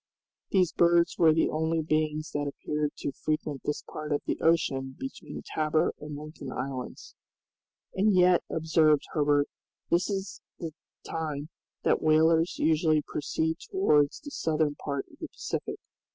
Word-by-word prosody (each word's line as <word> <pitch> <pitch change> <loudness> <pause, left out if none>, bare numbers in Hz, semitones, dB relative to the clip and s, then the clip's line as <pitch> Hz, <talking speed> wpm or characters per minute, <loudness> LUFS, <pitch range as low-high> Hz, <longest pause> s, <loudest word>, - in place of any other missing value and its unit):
These 185 -4 +3
birds 170 0 +3
were 165 -2 +7
the 160 - +2
only 160 +1 0
beings 155 0 0
that 145 0 -1
appeared 150 +1 -2
to - - -3
frequent 150 -1 -3
this 150 - -2
part 155 0 -7
of 145 - 0
the - - -2
ocean 135 -5 +1
between 270 0 -7
Tabor 155 0 +1
and 150 -1 -7
Lincoln 150 -3 -8
Islands. 130 -1 -5 0.8
"And 205 +3 +3
yet," 180 -1 +5
observed 160 -2 +3
Herbert, 145 -1 +3 0.4
"this 175 +4 +2
is 195 -1 -4 0.2
the 165 -3 -5 0.3
time 155 -2 -4 0.3
that - - +2
whalers 160 +2 +4
usually 155 -1 +3
proceed 160 +2 -2
towards 150 - +3
the 290 - -10
southern 155 - 0
part 140 -1 -4
of - - -19
the - - -5
Pacific. - - -4
155 Hz, 145 wpm, -28 LUFS, 150-165 Hz, 0.8 s, were